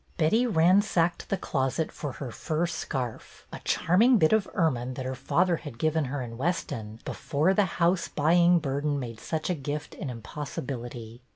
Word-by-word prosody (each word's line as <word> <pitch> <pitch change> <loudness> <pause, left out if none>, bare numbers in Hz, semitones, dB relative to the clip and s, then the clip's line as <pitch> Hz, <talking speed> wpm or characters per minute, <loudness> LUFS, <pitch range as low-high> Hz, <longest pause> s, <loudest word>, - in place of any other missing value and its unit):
Betty 220 +10 +3
ransacked 180 -2 +3
the 195 - +1
closet 140 -1 -1
for 145 -4 -5
her 130 -4 -6
fur 160 +8 -1
scarf, 130 -8 -5
— - - -19
a - - -6
charming 220 +10 +4
bit 160 0 +4
of 220 -3 +3
ermine 130 - 0
her 130 0 -3
father 175 +6 +1
had 145 -8 -9
given 155 +2 +1
her 135 0 -3
in 115 -1 -8
Weston 115 -9 -2
before 155 +5 +1
the 205 +1 +3
house 170 +1 +2
buying 170 +3 +4
burden 145 -1 -1
made 115 -4 -6
such 160 -1 -3
a 180 - +1
gift 145 -1 -4
an 145 - -5
impossibility. 120 -1 -6
155 Hz, 170 wpm, -27 LUFS, 130-175 Hz, -, charming